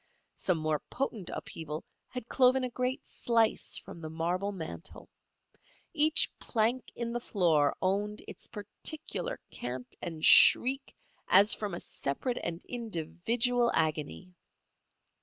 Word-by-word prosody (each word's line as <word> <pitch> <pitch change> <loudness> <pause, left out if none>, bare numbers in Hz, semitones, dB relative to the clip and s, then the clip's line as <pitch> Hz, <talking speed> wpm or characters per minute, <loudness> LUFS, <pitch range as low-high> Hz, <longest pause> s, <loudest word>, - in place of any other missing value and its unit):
Some 180 -3 0
more 155 -1 0
potent 230 -8 -3
upheaval 155 -1 -6 0.2
had 250 -2 -7
cloven 255 0 +4
a 250 - -2
great 250 +2 -2
slice 230 -2 +1
from 170 - -10
the 155 - -5
marble 175 +5 -1
mantel. 170 -2 -7 0.9
Each 310 0 +3
plank 235 +2 0
in 235 0 -3
the 240 - -1
floor 165 -10 +2
owned 205 +3 0
its - - -9
particular 305 - -5
cant 125 0 -5
and 160 -3 -3
shriek 270 +2 +6 0.3
as 200 +4 +7
from 205 -4 -3
a - - -5
separate 140 - -3
and 170 +1 -4
individual 235 +3 0
agony. 155 +4 -1
205 Hz, 120 wpm, -31 LUFS, 165-245 Hz, 0.9 s, as